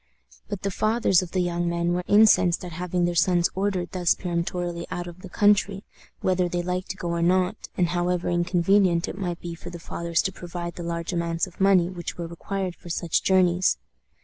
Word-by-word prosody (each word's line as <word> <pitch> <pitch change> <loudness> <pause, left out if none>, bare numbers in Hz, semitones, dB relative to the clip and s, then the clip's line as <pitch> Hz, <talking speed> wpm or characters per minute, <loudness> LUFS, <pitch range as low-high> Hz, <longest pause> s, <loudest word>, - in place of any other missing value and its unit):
But 205 -3 -5
the 200 - -1
fathers 215 -2 +2
of 180 - -6
the 185 +1 0
young 175 0 -1
men 170 0 0
were 180 0 -1
incensed 205 -4 +5
at 175 - -7
having 180 +1 -1
their 175 - 0
sons 175 +1 +3
ordered 190 -2 -1
thus 180 -2 +2
peremptorily 175 -1 -3
out 175 -1 -4
of 175 +1 -10
the 190 - -9
country, 205 0 +2 0.4
whether 185 -1 +1
they 175 0 -2
liked 180 +1 -3
to 190 - -4
go 175 - -4
or 170 0 -1
not, 185 +4 +1
and 175 -2 +2
however 175 0 0
inconvenient 175 +1 +2
it - - -5
might 180 -3 -3
be 170 -1 -5
for 170 +1 -9
the 175 - -8
fathers 170 0 -2
to 195 - -1
provide 175 -1 -6
the - - -8
large 170 +1 -3
amounts 170 -1 0
of 185 0 -12
money 190 -3 +5
which 175 -1 -6
were 170 - -4
required 180 +2 -4
for 175 - -13
such 165 0 0
journeys. 185 -1 +3
175 Hz, 205 wpm, -25 LUFS, 170-185 Hz, 0.4 s, incensed